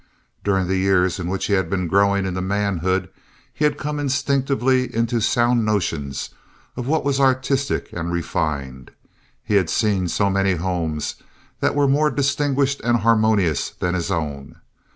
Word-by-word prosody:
During 95 Hz, -2 st, +1 dB
the 95 Hz, +1 st, 0 dB
years 95 Hz, -1 st, +2 dB
in 85 Hz, -, -3 dB
which 95 Hz, +1 st, -2 dB
he 100 Hz, -, 0 dB
had 95 Hz, -1 st, +1 dB
been 90 Hz, -2 st, -1 dB
growing 100 Hz, +2 st, +2 dB
into 95 Hz, -1 st, -2 dB
manhood 95 Hz, -1 st, 0 dB, 0.5 s
he 150 Hz, -, 0 dB
had 145 Hz, -1 st, +1 dB
come 150 Hz, 0 st, -3 dB
instinctively 135 Hz, -2 st, +1 dB
into 115 Hz, 0 st, 0 dB
sound 120 Hz, +1 st, +2 dB
notions 85 Hz, -10 st, -2 dB, 0.4 s
of 125 Hz, -, -5 dB
what 155 Hz, +1 st, 0 dB
was 140 Hz, -1 st, +1 dB
artistic 135 Hz, +1 st, +1 dB
and 85 Hz, 0 st, -3 dB
refined. 70 Hz, -6 st, -3 dB, 0.5 s
He 105 Hz, -2 st, +2 dB
had 90 Hz, -5 st, +1 dB
seen 100 Hz, -3 st, +1 dB
so 100 Hz, +4 st, +1 dB
many 95 Hz, 0 st, +2 dB
homes 85 Hz, -3 st, -2 dB, 0.4 s
that -, -, +1 dB
were 145 Hz, -1 st, +3 dB
more 150 Hz, +3 st, +3 dB
distinguished 140 Hz, 0 st, 0 dB
and 120 Hz, -1 st, +2 dB
harmonious 110 Hz, -8 st, +2 dB
than 90 Hz, 0 st, -3 dB
his 85 Hz, -2 st, -2 dB
own. 70 Hz, -4 st, -4 dB
100 Hz, 155 wpm, -21 LUFS, 90-130 Hz, 0.5 s, were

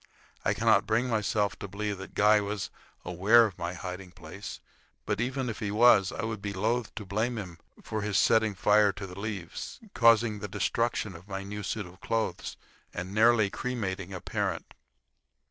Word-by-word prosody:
I -, -, +1 dB
cannot 110 Hz, -2 st, +3 dB
bring 115 Hz, +4 st, +2 dB
myself 105 Hz, -2 st, 0 dB
to -, -, -5 dB
believe 100 Hz, 0 st, -3 dB
that 95 Hz, -, -10 dB
Guy 105 Hz, +1 st, +5 dB
was 100 Hz, -1 st, -4 dB, 0.3 s
aware 105 Hz, +7 st, +5 dB
of 100 Hz, -6 st, -6 dB
my 85 Hz, +1 st, -3 dB
hiding 90 Hz, 0 st, -6 dB
place, 90 Hz, +3 st, -9 dB, 0.5 s
but -, -, -1 dB
even 130 Hz, +1 st, -1 dB
if 115 Hz, -, -4 dB
he 105 Hz, -, -2 dB
was, 105 Hz, -2 st, +5 dB
I 115 Hz, -, -5 dB
would 110 Hz, -2 st, -3 dB
be 100 Hz, -1 st, -4 dB
loath 110 Hz, +4 st, -1 dB
to 110 Hz, -, -6 dB
blame 110 Hz, +5 st, -1 dB
him 90 Hz, -6 st, -7 dB, 0.2 s
for 110 Hz, -, -3 dB
his 105 Hz, -1 st, 0 dB
setting 110 Hz, -2 st, +3 dB
fire 105 Hz, +1 st, +4 dB
to 95 Hz, 0 st, -7 dB
the 90 Hz, 0 st, -9 dB
leaves, 100 Hz, -5 st, -5 dB
causing 115 Hz, -2 st, +4 dB
the 105 Hz, -, -5 dB
destruction 110 Hz, -1 st, -1 dB
of 85 Hz, +4 st, -13 dB
my 95 Hz, -1 st, -4 dB
new 105 Hz, +1 st, -6 dB
suit 105 Hz, +1 st, -3 dB
of 90 Hz, +2 st, -15 dB
clothes, 115 Hz, -1 st, -2 dB, 0.3 s
and 90 Hz, +2 st, -6 dB
nearly 110 Hz, -2 st, +4 dB
cremating 100 Hz, -7 st, -3 dB
a 95 Hz, -, -5 dB
parent. -, -, -3 dB
105 Hz, 180 wpm, -29 LUFS, 95-110 Hz, 0.5 s, Guy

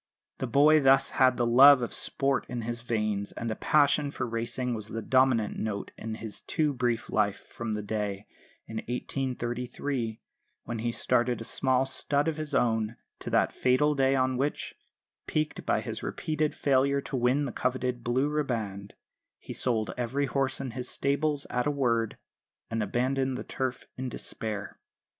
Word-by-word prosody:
The 130 Hz, -, -2 dB
boy 150 Hz, +5 st, +6 dB
thus 135 Hz, -1 st, +5 dB
had 130 Hz, -1 st, +5 dB
the 120 Hz, -, +2 dB
love 130 Hz, +2 st, +8 dB
of 120 Hz, -, -3 dB
sport 135 Hz, -1 st, +1 dB
in 120 Hz, -2 st, -3 dB
his 120 Hz, +1 st, -3 dB
veins; 105 Hz, -4 st, -1 dB
and 115 Hz, -1 st, -3 dB
a -, -, -2 dB
passion 145 Hz, +1 st, +3 dB
for 140 Hz, -, -3 dB
racing 120 Hz, +2 st, -2 dB
was 110 Hz, -2 st, -4 dB
the 115 Hz, +1 st, -4 dB
dominant 130 Hz, -5 st, +2 dB
note 105 Hz, -2 st, -3 dB
in 110 Hz, 0 st, -5 dB
his 110 Hz, -1 st, -5 dB
too 150 Hz, -2 st, 0 dB
brief 120 Hz, -3 st, -1 dB
life 105 Hz, -2 st, 0 dB
from 115 Hz, -2 st, -4 dB
the 105 Hz, 0 st, -3 dB
day, 105 Hz, -1 st, -3 dB, 0.4 s
in 110 Hz, -, -7 dB
1833, 125 Hz, -1 st, -3 dB, 0.4 s
when 120 Hz, -2 st, -4 dB
he 120 Hz, +1 st, -1 dB
started 120 Hz, 0 st, +1 dB
a -, -, -5 dB
small 130 Hz, +2 st, +1 dB
stud 140 Hz, +2 st, 0 dB
of 160 Hz, -1 st, -1 dB
his 155 Hz, -2 st, -4 dB
own, 110 Hz, -1 st, +1 dB, 0.2 s
to -, -, -6 dB
that -, -, +2 dB
fatal 130 Hz, +4 st, +3 dB
day 135 Hz, -1 st, +3 dB
on 130 Hz, -1 st, +1 dB
which, 140 Hz, +3 st, -2 dB, 0.5 s
piqued 155 Hz, 0 st, -2 dB
by -, -, +2 dB
his -, -, -5 dB
repeated 155 Hz, -1 st, -2 dB
failure 140 Hz, 0 st, +2 dB
to 135 Hz, -, -5 dB
win 130 Hz, +3 st, +2 dB
the 130 Hz, -, -3 dB
coveted 125 Hz, -1 st, -1 dB
"blue 130 Hz, +4 st, +1 dB
riband," 115 Hz, -10 st, -3 dB, 0.4 s
he -, -, -8 dB
sold 115 Hz, -4 st, -1 dB
every 130 Hz, +4 st, 0 dB
horse 135 Hz, -1 st, -1 dB
in 135 Hz, -2 st, -4 dB
his 125 Hz, +1 st, -5 dB
stables 140 Hz, +1 st, 0 dB
at 125 Hz, +2 st, 0 dB
a -, -, +3 dB
word, 120 Hz, -6 st, 0 dB, 0.5 s
and 115 Hz, 0 st, 0 dB
abandoned 130 Hz, +5 st, 0 dB
the -, -, -5 dB
Turf 130 Hz, -1 st, -3 dB
in 130 Hz, 0 st, -3 dB
despair. 105 Hz, -3 st, -5 dB
125 Hz, 170 wpm, -28 LUFS, 115-135 Hz, 0.5 s, love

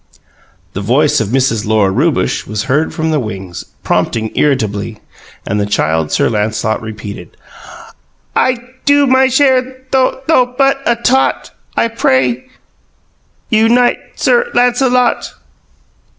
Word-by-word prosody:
The 95 Hz, -, -4 dB
voice 145 Hz, +7 st, +2 dB
of 110 Hz, -, -1 dB
Mrs. 125 Hz, -2 st, 0 dB
Lora 105 Hz, -3 st, +2 dB
Rewbush 145 Hz, -, 0 dB
was 105 Hz, 0 st, -3 dB
heard 140 Hz, +5 st, 0 dB
from 160 Hz, 0 st, -2 dB
the 155 Hz, -, +1 dB
wings, 95 Hz, -6 st, -6 dB, 0.2 s
prompting 110 Hz, -1 st, -1 dB
irritably, 110 Hz, -6 st, -1 dB, 0.5 s
and 105 Hz, +2 st, -1 dB
the 100 Hz, -, -1 dB
Child. 80 Hz, -5 st, 0 dB
Sir -, -, +2 dB
Lancelot 110 Hz, 0 st, -1 dB
repeated: 105 Hz, -5 st, -9 dB, 1.0 s
"I 255 Hz, -1 st, +2 dB, 0.3 s
do 285 Hz, 0 st, +4 dB
my 260 Hz, 0 st, +4 dB
share 260 Hz, 0 st, +3 dB, 0.3 s
though 260 Hz, -1 st, +3 dB
but 265 Hz, -, -18 dB
though 250 Hz, -6 st, +2 dB
but 275 Hz, 0 st, +2 dB
a 235 Hz, -, +3 dB
tot, 255 Hz, +3 st, 0 dB, 0.3 s
I -, -, +3 dB
pray 130 Hz, -, 0 dB, 1.0 s
you 225 Hz, 0 st, +3 dB
knight 245 Hz, +1 st, +3 dB, 0.2 s
Sir 485 Hz, 0 st, +2 dB
Lancelot!" 245 Hz, 0 st, +1 dB
140 Hz, 130 wpm, -14 LUFS, -, 1.0 s, do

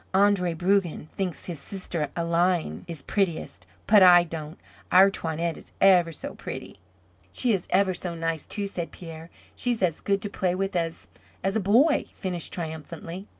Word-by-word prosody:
Andre 195 Hz, -3 st, +3 dB
Brugen 180 Hz, -2 st, +1 dB
thinks 185 Hz, -4 st, -4 dB
his 170 Hz, -5 st, -6 dB
sister 170 Hz, -2 st, -4 dB
Aline 170 Hz, +1 st, 0 dB
is 165 Hz, -5 st, -5 dB
prettiest, 190 Hz, -3 st, -2 dB, 0.2 s
but 210 Hz, -1 st, +6 dB
I 175 Hz, -1 st, +8 dB
don't. 160 Hz, -2 st, -7 dB, 0.3 s
Our 190 Hz, +2 st, +7 dB
Toinette 165 Hz, -2 st, -2 dB
is -, -, -15 dB
ever 180 Hz, -3 st, +5 dB
so 160 Hz, -, -7 dB
pretty." -, -, -8 dB, 0.5 s
"She 235 Hz, -, +1 dB
is 190 Hz, -3 st, -2 dB
ever 190 Hz, 0 st, +3 dB
so 175 Hz, -1 st, -4 dB
nice, 165 Hz, -1 st, -3 dB
too," 205 Hz, -2 st, -3 dB
said 175 Hz, -5 st, -4 dB
Pierre. 165 Hz, -1 st, -10 dB, 0.3 s
"She's 240 Hz, -5 st, -1 dB
as 165 Hz, -4 st, 0 dB
good 200 Hz, -1 st, 0 dB
to -, -, -2 dB
play 185 Hz, -3 st, -1 dB
with 195 Hz, +1 st, -2 dB
as 165 Hz, -1 st, -2 dB, 0.4 s
as 195 Hz, +2 st, 0 dB
a -, -, +3 dB
boy," 240 Hz, -, +4 dB
finished 180 Hz, -4 st, -4 dB
triumphantly. 165 Hz, +3 st, -6 dB
180 Hz, 165 wpm, -26 LUFS, 165-195 Hz, 0.5 s, I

